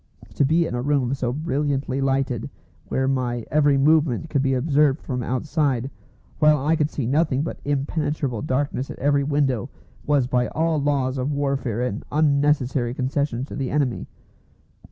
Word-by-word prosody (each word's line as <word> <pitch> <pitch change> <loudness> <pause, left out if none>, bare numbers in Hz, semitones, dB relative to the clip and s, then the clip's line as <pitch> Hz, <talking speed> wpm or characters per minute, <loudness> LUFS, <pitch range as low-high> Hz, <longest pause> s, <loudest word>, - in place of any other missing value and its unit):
To - - +2
be 160 +5 +3
in - - -4
a 120 - -1
room 135 -2 +1
so 130 -3 -1
brilliantly 140 -1 -1
lighted, 135 -3 0 0.4
where 130 0 0
my 125 -3 -1
every 145 -2 +4
movement 155 0 +2
could 140 - +2
be 135 -1 +1
observed 145 +1 +2
from 125 -3 -4
outside, 135 0 -1 0.5
while 150 0 +5
I 160 +2 +3
could 150 -2 +1
see 140 - -3
nothing 140 +1 +1
but - - -5
impenetrable 145 -3 -1
darkness 135 -1 -1
at - - -7
every 140 +1 +2
window, 135 -6 0 0.4
was 145 -3 +3
by 125 -1 +1
all 160 -1 0
laws 135 -2 0
of 130 +3 -1
warfare 135 -5 -1
an 115 -4 -2
unnecessary 140 -4 +1
concession 135 -1 -1
to - - -9
the 135 -2 -2
enemy. 140 -5 -1
140 Hz, 160 wpm, -23 LUFS, 130-150 Hz, 0.5 s, while